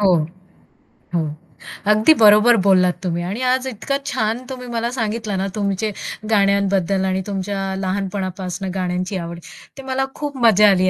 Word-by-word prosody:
हो. 190 Hz, -3 st, +5 dB, 1.0 s
हो. 170 Hz, -, +2 dB, 0.7 s
अगदी 215 Hz, +8 st, +6 dB
बरोबर 215 Hz, +2 st, +7 dB
बोललात 185 Hz, -2 st, +4 dB
तुम्ही 175 Hz, -1 st, -1 dB
आणि 220 Hz, +6 st, -4 dB
आज 260 Hz, 0 st, -1 dB
इतका 260 Hz, +3 st, -2 dB
छान 220 Hz, +2 st, -1 dB
तुम्ही 250 Hz, -1 st, -7 dB
मला 230 Hz, +1 st, -1 dB
सांगितलं 220 Hz, -3 st, -2 dB
ना, 195 Hz, -, -1 dB
तुमचे 205 Hz, +1 st, -1 dB, 0.4 s
गाण्यांबद्दल 195 Hz, -2 st, +2 dB
आणि 190 Hz, 0 st, 0 dB
तुमच्या 200 Hz, 0 st, -3 dB, 0.2 s
लहानपणापासून 190 Hz, -1 st, -3 dB
गाण्यांची 185 Hz, +1 st, -2 dB
आवड, 170 Hz, 0 st, -7 dB, 0.4 s
ते 270 Hz, -, -8 dB
मला 265 Hz, +1 st, +1 dB
खूप 290 Hz, -2 st, -5 dB
मजा 210 Hz, -1 st, +7 dB
आली 185 Hz, -1 st, +3 dB
200 Hz, 145 wpm, -20 LUFS, 185-220 Hz, 1.0 s, बरोबर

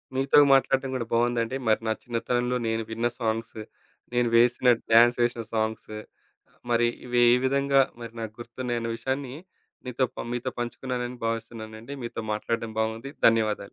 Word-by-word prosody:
మీతో 135 Hz, +2 st, +4 dB
మాట్లాడటం 135 Hz, 0 st, +2 dB
కూడా 120 Hz, -, -2 dB
బావుందండి. 120 Hz, +1 st, +1 dB
మరి 110 Hz, 0 st, +3 dB
నా 110 Hz, -, +2 dB
చిన్నతనంలో 125 Hz, +1 st, -1 dB
నేను 115 Hz, 0 st, -1 dB
విన్న 115 Hz, +2 st, 0 dB
సాంగ్స్, 110 Hz, -1 st, -2 dB, 0.5 s
నేను 120 Hz, -1 st, +2 dB
వేసిన 120 Hz, +2 st, +4 dB, 0.3 s
డాన్సేసిన 120 Hz, 0 st, +4 dB
సాంగ్స్, 110 Hz, 0 st, -2 dB, 0.8 s
మరి 120 Hz, 0 st, +3 dB, 0.2 s
ఇవి 125 Hz, 0 st, 0 dB
ఏ -, -, +7 dB
విధంగా 140 Hz, 0 st, +3 dB, 0.2 s
మరి 115 Hz, -1 st, -8 dB
నాకు 110 Hz, -1 st, -5 dB
గుర్తున్నాయి 120 Hz, 0 st, -4 dB
అనే 115 Hz, -, -3 dB
విషయాన్ని 130 Hz, +2 st, -3 dB, 0.5 s
మీతో 125 Hz, +1 st, 0 dB
పం -, -, -5 dB
మీతో 125 Hz, +1 st, -2 dB
పంచుకున్నానని 125 Hz, 0 st, -4 dB
భావిస్తున్నానండి. 115 Hz, +1 st, -6 dB
మీతో 115 Hz, -1 st, -5 dB
మాట్లాడటం 115 Hz, +1 st, -3 dB
బావుంది. 110 Hz, +5 st, -2 dB, 0.2 s
ధన్యవాదాలు. 110 Hz, -3 st, +1 dB
120 Hz, 140 wpm, -26 LUFS, 115-125 Hz, 0.8 s, ఏ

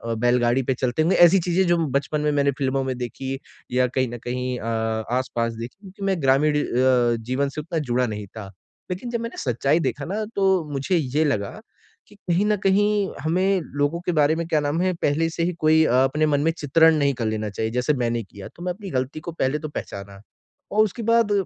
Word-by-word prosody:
बेलगाड़ी 120 Hz, +2 st, +2 dB
पे 130 Hz, -, 0 dB
चलते 125 Hz, +3 st, -1 dB
होंगे, 165 Hz, +4 st, +3 dB
ऐसी 175 Hz, +2 st, +7 dB
चीज़ें 180 Hz, +2 st, +1 dB
जो 175 Hz, 0 st, +3 dB
बचपन 145 Hz, +3 st, -1 dB
में 150 Hz, 0 st, +1 dB
मैंने 140 Hz, -1 st, +2 dB
फ़िल्मों 135 Hz, 0 st, 0 dB
में 130 Hz, -1 st, -3 dB
देखी 130 Hz, +2 st, -4 dB, 0.3 s
या 125 Hz, 0 st, +2 dB
कहीं 130 Hz, -1 st, +2 dB
न -, -, -4 dB
कहीं 125 Hz, 0 st, -3 dB
अ, -, -, -7 dB, 0.5 s
आस-पास 120 Hz, -2 st, -1 dB
देखी 115 Hz, +6 st, -8 dB
क्योंकि 195 Hz, +1 st, -11 dB
मैं 190 Hz, -5 st, 0 dB
ग्रामीण 140 Hz, +3 st, +3 dB
अ, 125 Hz, -1 st, +2 dB
जीवन 130 Hz, +5 st, -1 dB
से 150 Hz, -, -5 dB
उतना 165 Hz, +2 st, -3 dB
जुड़ा 125 Hz, -3 st, 0 dB
नहीं 105 Hz, -2 st, -5 dB
था। 100 Hz, -1 st, -9 dB, 0.4 s
लेकिन 190 Hz, +7 st, -4 dB
जब 235 Hz, -, -2 dB
मैंने 230 Hz, -, -6 dB
सच्चाई 135 Hz, +5 st, +1 dB
देखा -, -, -2 dB
ना 210 Hz, +5 st, -2 dB
तो 195 Hz, -, +1 dB, 0.3 s
मुझे 140 Hz, +7 st, -1 dB
ये 150 Hz, 0 st, 0 dB
लगा 100 Hz, -9 st, 0 dB, 0.6 s
कि -, -, -18 dB
कहीं 185 Hz, 0 st, 0 dB
न 210 Hz, 0 st, +3 dB
कहीं 205 Hz, +1 st, +2 dB
हमें 185 Hz, +4 st, +1 dB, 0.2 s
लोगों 145 Hz, +4 st, +1 dB
के -, -, +1 dB
बारे 150 Hz, 0 st, +3 dB
में 170 Hz, +1 st, -2 dB
क्या 155 Hz, -2 st, +2 dB
नाम 145 Hz, +4 st, -1 dB
है 185 Hz, 0 st, +1 dB
पहले 160 Hz, +3 st, +1 dB
से 165 Hz, +1 st, -2 dB
ही 180 Hz, -, 0 dB
कोई 160 Hz, +1 st, +4 dB
अपने 135 Hz, +4 st, +2 dB
मन 145 Hz, -2 st, +1 dB
में 160 Hz, +2 st, +2 dB
अ, -, -, -9 dB
चित्रण 160 Hz, +3 st, +4 dB
नहीं 140 Hz, -2 st, +2 dB
कर 120 Hz, -3 st, -3 dB
लेना 110 Hz, -1 st, -2 dB
चाहिए। 110 Hz, +3 st, -3 dB
जैसे 125 Hz, +4 st, +1 dB
मैंने 115 Hz, 0 st, -1 dB
किया 100 Hz, 0 st, -11 dB
तो 175 Hz, -, -10 dB
मैं 180 Hz, 0 st, -1 dB
अपनी 200 Hz, +1 st, -9 dB
गलती 130 Hz, +3 st, -2 dB
को 170 Hz, +2 st, -6 dB
पहले 150 Hz, -2 st, -1 dB
तो 155 Hz, -, -6 dB
पहचाना। 100 Hz, -7 st, -7 dB, 0.5 s
और 215 Hz, +1 st, +4 dB
उसके 215 Hz, +3 st, -3 dB
बाद 230 Hz, -1 st, +3 dB
145 Hz, 220 wpm, -23 LUFS, 125-170 Hz, 0.6 s, ऐसी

